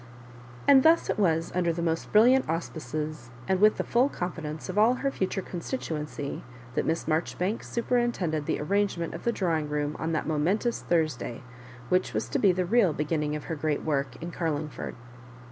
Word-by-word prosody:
And 275 -2 +8
thus 325 +4 +4
it - - -3
was, 165 -4 +2
under 175 -2 +1
the 170 +1 -3
most 165 -1 -1
brilliant 245 +3 +5
auspices, 155 -4 -4 0.2
and 190 -1 +2
with 215 0 +6
the - - 0
full 250 +4 +2
confidence 160 - -5
of 190 +2 -1
all 230 +4 +5
her 275 +2 -1
future 190 -4 -2
consti 180 +9 -4
tuency, 150 - -5 0.3
that - - -1
Miss 160 +1 0
Maijoribanks 175 +6 -1
superintended 235 -11 0
the - - 0
arrangement 185 0 0
of - - -8
the 235 - +3
drawing 165 -8 -1
room 150 0 -1
on 160 - -1
that 155 - -1
mo 155 -1 0
mentous 205 +10 0
Thursday, 155 -7 -1 0.5
which 180 0 +1
was - - -1
to - - 0
be 195 - +5
the 180 0 0
real 200 -3 +3
be 150 - -2
ginning 150 -1 -1
of 150 - -5
her 165 - -4
great 150 0 -1
work 140 -5 -1
in 170 - -5
Carlmgford. 155 -3 -3
170 Hz, 190 wpm, -28 LUFS, 155-205 Hz, 0.5 s, And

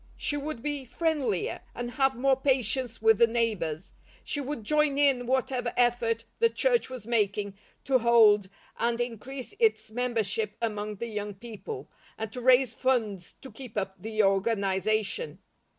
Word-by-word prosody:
She 290 - -1
would 290 -4 -4
be 290 -2 -2
friendlier, 265 - -1 0.2
and 240 0 -4
have 270 0 +2
more 265 +3 +3
patience 255 -3 0
with 225 -1 +5
the 235 - +7
neighbours. 210 -8 -1 0.3
She 290 - -2
would 275 -4 -5
join 300 +3 +2
in 270 -4 +3
whatever 255 -1 0
effort 235 -2 +2 0.2
the 460 - +5
church 480 - +1
was 255 -5 -7
making 205 -3 0 0.3
to 265 -2 +3
hold 220 -4 +5 0.3
and 235 +1 0
increase 245 +2 -5
its 220 -1 +2
membership 220 -3 -1
among 210 -2 -3
the 235 - -5
young 210 -2 -4
people, 235 - -8 0.3
and 220 -1 -5
to 250 - -5
raise 255 -1 +5
funds 220 -9 -1
to 265 - -9
keep 230 -1 -10
up 190 -2 -3
the 215 +1 0
organization. 200 - 0
235 Hz, 150 wpm, -28 LUFS, 210-260 Hz, 0.3 s, the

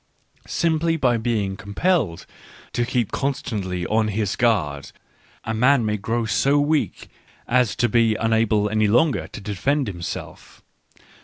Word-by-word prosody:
Simply 165 0 +1
by 125 -5 +2
being 110 -4 -1
compelled 100 - -1 0.5
to 120 0 0
keep 120 -4 -1
con 140 +1 0
stantly 95 - -4
on 110 0 +1
his 105 -1 -1
guard, 85 - 0 0.5
a 110 - -3
man 125 +2 +3
may 105 0 0
grow 115 +3 -2
so 125 +8 +2
weak 150 +1 0 0.4
as 125 -3 +2
to 120 - +2
be 115 -2 +3
unable 110 -2 +1
any 110 0 +1
longer 125 +8 +2
to - - -9
defend 110 - -1
himself. 85 -4 -7
115 Hz, 140 wpm, -22 LUFS, 105-130 Hz, 0.5 s, man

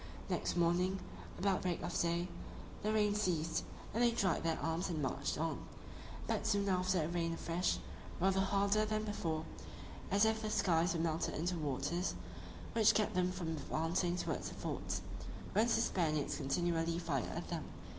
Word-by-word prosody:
Next - - 0
morning, 180 +3 +2 0.4
about 195 0 +2
break 180 -2 -1
of - - -3
day, 170 +1 +1 0.5
the 215 - +1
rain 210 -1 +3
ceased, 170 -6 0 0.3
and 230 - +1
they 240 - +6
dried 200 -7 +1
their 165 -1 +1
arms 165 +3 -1
and 165 -3 -1
marched 140 0 -1
on: 160 +1 -1 0.7
but - - 0
soon 200 -2 +2
after 185 -2 +2
it 165 +3 -2
rained 165 -1 0
afresh, 170 +2 0 0.4
rather 190 +2 +3
harder 200 +2 +3
than 215 0 0
before, 165 -7 -2 0.6
as 200 +2 +5
if 220 0 +2
the 215 - -2
skies 170 -3 +3
were - - 0
melted 165 -1 0
into 175 +3 0
waters; 150 +3 -1 0.6
which 225 -2 +5
kept 215 - +2
them 180 0 +2
from 180 -3 -3
advancing 165 +3 0
towards - - -2
the - - -9
forts, - - -3 0.5
whence 220 +4 +4
the - - +3
Spaniards 155 -9 +1
continually 165 +3 +1
fired 155 -8 -1
at - - -4
them. - - -3
175 Hz, 165 wpm, -36 LUFS, 165-200 Hz, 0.7 s, they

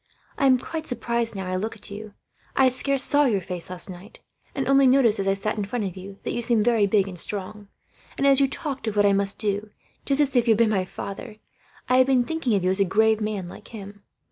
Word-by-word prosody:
I 275 - +2
am 255 -1 +5
quite 315 +5 -6
surprised, 235 -2 -1
now 190 -1 -4
I 185 0 -3
look 220 +4 -4
at 210 - -12
you 210 0 -9 0.4
I 265 -1 +5
scarce 270 +1 -1
saw 290 +1 +3
your 220 -7 +1
face, 180 -1 -7
last 180 -1 -1
night; 190 +3 -11 0.4
and 270 - -2
only 275 0 +5
noticed, 250 -5 +4
as 195 - -1
I 195 - +2
sat 215 +2 -1
in - - -1
front 215 +3 -3
of 185 - -5
you, 195 +1 -10
that - - -3
you 240 - -2
seemed 230 -2 +1
very 230 -4 +3
big 200 -1 +2
and 180 -3 -6
strong. 205 +2 -4 0.5
And 275 - 0
as 275 -1 +5
you 275 - +4
talked 275 -3 -5
of 215 - -2
what 205 0 +3
I 200 - +4
must 200 0 0
do, 205 0 -2 0.3
just 275 0 +2
as 280 -2 +1
if 240 -1 +3
you 225 - +6
had - - -1
been 230 -1 +3
my 190 -3 0
father, 200 +4 -8 0.5
I 255 - +3
have 260 0 +5
been 260 -2 +3
thinking 320 -8 -1
of 195 - 0
you 185 - +2
as 190 - +1
a - - +5
grave 220 +3 +2
man, 210 -4 -3
like - - -12
him. 205 -2 -10
215 Hz, 260 wpm, -24 LUFS, 195-255 Hz, 0.5 s, you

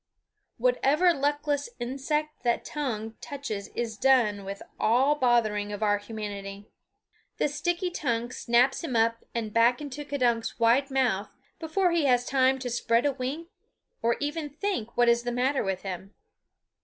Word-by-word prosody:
Whatever 355 - +3
luckless 290 +3 -1
insect 300 +5 -2
the 240 -1 +2
tongue 225 -7 -4
touches 245 -8 -5
is 230 -2 -3
done 225 -6 +3
with 195 +1 -6 0.2
all 255 +6 +4
bothering 230 -6 +1
of 205 +1 -4
our 205 -1 +2
humanity. 205 -2 -7 0.7
The - - +2
sticky 350 +5 -1
tongue 240 -7 -2
snaps 250 +5 +2
him 275 -7 -3
up 230 0 +2
and 220 -3 -3
back 235 +2 +4
into 295 -1 -6
K'dunk's 245 -6 0
wide 240 +5 +3
mouth 245 -7 +1 0.3
before 350 +3 +1
he 335 -3 +2
has 245 -2 +3
time 265 0 +3
to - - -1
spread 235 +1 +1
a 285 - +3
wing 280 +6 -4 0.5
or 235 0 +1
even 295 +1 -3
to 285 - -26
think 315 - -3
what 240 0 +4
is 235 0 +4
the 245 0 -3
matter 260 +3 +1
with 190 -2 -2
him. 190 +1 -6
245 Hz, 155 wpm, -27 LUFS, 225-290 Hz, 0.7 s, all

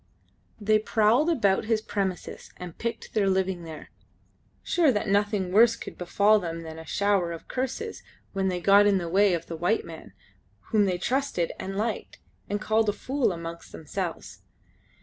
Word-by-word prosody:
They 215 0 +3
prowled 225 +8 +3
about 205 - +2
his 220 0 +1
premises 195 -4 -4
and 180 -2 -8
picked 230 -1 -5
their 205 -3 +2
living 190 -2 0
there, 160 -2 -10 0.7
sure 330 -5 +3
that 210 -2 -1
nothing 200 -2 +1
worse 230 +4 +6
could - - -9
befall 200 +4 +3
them 165 -3 -5
than 160 0 -8
a 160 - -11
shower 200 -4 +1
of 165 - -8
curses 265 - -4 0.3
when 195 -1 0
they 180 -1 -1
got 200 +2 +6
in 200 -1 +4
the 175 -2 -3
way 195 +2 +3
of 165 -1 -5
the 165 - -6
white 175 +7 0
man, - - -11 0.6
whom 215 -3 +4
they 185 -2 0
trusted 250 -5 -1
and 195 +1 -5
liked, 215 +1 -3 0.3
and 205 - -1
called 220 0 +1
a - - +1
fool 260 +3 0
amongst 170 -1 -7
themselves. 170 +2 -6
200 Hz, 170 wpm, -26 LUFS, 180-220 Hz, 0.7 s, worse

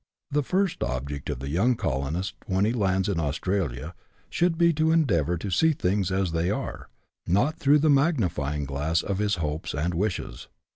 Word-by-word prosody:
The 145 +1 +2
first 185 +6 0
object 70 +2 -3
of - - -2
the 70 - -4
young 100 - +2
colonist 75 +2 -2
when 95 +1 +2
he 110 - +1
lands 95 -5 +1
in 95 -5 0
Aus 75 -1 -1
tralia 85 -6 -2 0.4
should 175 -1 +1
be 170 0 +4
to 160 +1 +2
endeavour 90 - +2
to 95 +4 -5
see 160 - +3
things 95 -5 0
as 95 -2 0
they 85 +2 0
are, - - -4 0.4
not 135 - +1
through 145 -1 +5
the 155 +1 +2
magnifying 90 - +1
glass 75 +5 -1
of 100 -1 -2
his 105 -1 +1
hopes 75 -4 -3
and 85 +4 -1
wishes. 95 +3 -3
95 Hz, 185 wpm, -26 LUFS, -, 0.4 s, through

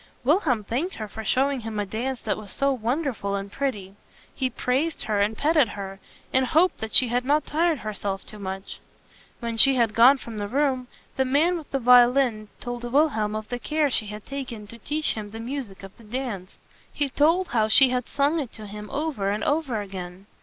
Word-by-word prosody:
Wilhelm 270 - +2
thanked 270 - -2
her 215 - -5
for 220 +2 -8
showing 270 +5 +1
him 220 -2 -5
a 205 - -1
dance 240 +6 -3
that - - -1
was 210 -3 -9
so 275 0 +1
wonderful 240 -4 -2
and 195 0 -5
pretty. 205 -9 -3 0.4
He 260 -2 -1
praised 265 +6 -1
her, 210 -2 +1
petted 300 -3 +3
her, 195 -1 -6 0.3
and 260 - +4
hoped 340 +7 +3
that 220 0 -3
she 255 - +7
had 245 +1 0
not 290 +3 +2
tired 325 +1 +1
herself 200 -2 -3
too 215 - -11
much. 190 0 -6 0.6
When 230 -1 -3
she 270 +3 +7
had 230 -3 +2
gone 245 +6 +7
from 230 -4 -7
the 205 - -3
room, 260 +1 0 0.3
the 265 - +3
man 295 +7 +2
with 320 -4 -7
the 275 - -1
violin 245 -2 +4
told 245 0 -6
Wilhelm 240 -5 +1
of 215 0 -5
the 245 - -3
care 300 +1 0
she 215 -3 -1
had 210 0 -8
taken 255 -6 -6
to 235 - -12
teach 305 +5 0
him 210 -2 -6
the 225 +2 -8
music 235 -5 -6
of 195 0 -11
the - - -15
dance. 215 -5 -5 0.3
He 290 - -1
told 330 +7 +2
how 220 -3 +2
she 260 +4 +7
had 250 -1 -2
sung 290 +3 +1
it 270 -6 -4
to 215 - -9
him 210 0 -8
over 280 -9 -1
and 205 +1 -1
over 290 -8 0
again. 190 -1 -8
245 Hz, 205 wpm, -25 LUFS, 210-280 Hz, 0.6 s, she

